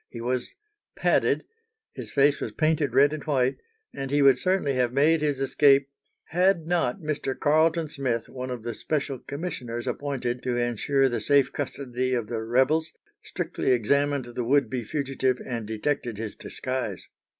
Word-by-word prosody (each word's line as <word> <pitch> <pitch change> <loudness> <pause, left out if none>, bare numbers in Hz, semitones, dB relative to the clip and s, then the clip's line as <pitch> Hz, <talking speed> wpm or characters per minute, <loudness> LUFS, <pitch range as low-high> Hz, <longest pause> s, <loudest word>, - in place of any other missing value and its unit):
He 120 - -8
was 125 +1 -2 0.4
padded, - - +2 0.5
his - - -7
face 140 0 +3
was - - -4
painted 155 -5 +1
red 140 +2 +5
and 155 - -5
white, 135 -4 +1 0.4
and 135 -1 -5
he 145 +1 +3
would 135 -2 +6
certainly 185 -7 +1
have 125 -2 +1
made 150 +4 +3
his 145 -3 0
escape 140 0 +4 0.4
had 180 0 +2
not 175 +3 0
Mr. 150 -4 -3
Carleton 160 +2 +3
Smith, 130 -6 -2
one 130 0 -6
of 125 -3 -5
the 120 0 -3
special 140 +1 -2
commissioners 130 -7 -5
appointed 125 -4 -3
to 125 -1 -1
ensure 120 +3 +1
the 120 - -2
safe 140 -2 +3
custody 130 -2 -2
of 120 -3 -1
the 115 -2 -2
rebels, 130 +8 +1 0.3
strictly - - -3
examined 140 +3 +1
the 120 0 -4
would 140 +4 +2
be 125 -2 -2
fugitive 130 -1 -1
and 115 -4 -4
detected 115 +1 -2
his 110 -1 -5
disguise. 130 -7 -4
135 Hz, 160 wpm, -26 LUFS, 125-145 Hz, 0.5 s, would